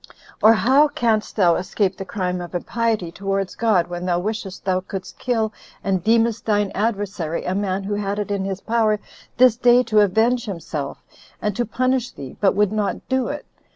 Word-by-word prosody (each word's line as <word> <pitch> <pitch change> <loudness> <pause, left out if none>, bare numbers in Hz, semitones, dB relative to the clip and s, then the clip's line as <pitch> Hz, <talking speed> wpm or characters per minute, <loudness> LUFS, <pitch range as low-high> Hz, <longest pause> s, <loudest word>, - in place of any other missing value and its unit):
Or 220 +1 +8
how 265 +7 +4
canst 235 -7 0
thou 180 -5 +4
escape 190 +1 -1
the 195 - -6
crime 180 -2 -2
of 175 0 -7
impiety 220 -1 -1
towards 195 +1 -2
God, 215 -7 +2
when 175 0 -6
thou 175 -1 +2
wishest 200 0 -4
thou 185 -1 +2
couldst 185 0 -8
kill, 225 -4 0 0.3
and 190 -3 0
deemest 225 0 +2
thine 205 -2 +2
adversary, 200 -6 -2
a 180 - -1
man 195 -1 -1
who 205 +2 -3
had 205 0 -2
it 210 -1 -3
in 200 -1 -1
his 195 0 -4
power 220 -2 +1 0.4
this 250 -2 +6
day 245 0 +5
to 215 -3 +2
avenge 220 +5 +3
himself, 165 -7 -5 0.4
and 210 -2 -2
to 240 +2 -1
punish 255 +1 0
thee, 135 -2 -9
but 195 - +3
would 205 -1 +2
not 210 -2 -2
do 260 -2 +1
it? 295 - -5
205 Hz, 190 wpm, -22 LUFS, 190-230 Hz, 0.4 s, Or